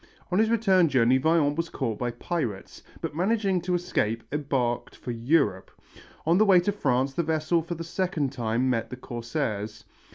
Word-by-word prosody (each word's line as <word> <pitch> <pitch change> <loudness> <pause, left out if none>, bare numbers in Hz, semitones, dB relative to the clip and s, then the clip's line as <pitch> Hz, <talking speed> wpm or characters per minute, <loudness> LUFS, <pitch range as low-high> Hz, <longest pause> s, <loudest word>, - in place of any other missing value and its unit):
On 180 - +2
his 220 0 +3
return 195 -7 +4
journey 130 -1 +4
Vaillant 150 0 +2
was 165 +1 -2
caught 115 -6 -3
by 125 - -1
pirates, 120 - -4 0.2
but - - -4
managing 195 0 +1
to 180 +1 0
escape 115 -10 -1
embarked 135 -5 -1
for 125 - -6
Europe. 120 - +1 0.6
On 170 +4 +3
the 215 - +6
way 190 -3 +6
to 205 - 0
France 135 -8 0
the 170 - 0
vessel 160 +1 +1
for 170 +2 -5
the 165 - -6
second 165 -5 -1
time 120 -1 -1
met 120 -3 0
the 125 - -7
corsairs. 115 -4 -4
145 Hz, 175 wpm, -26 LUFS, 120-175 Hz, 0.6 s, the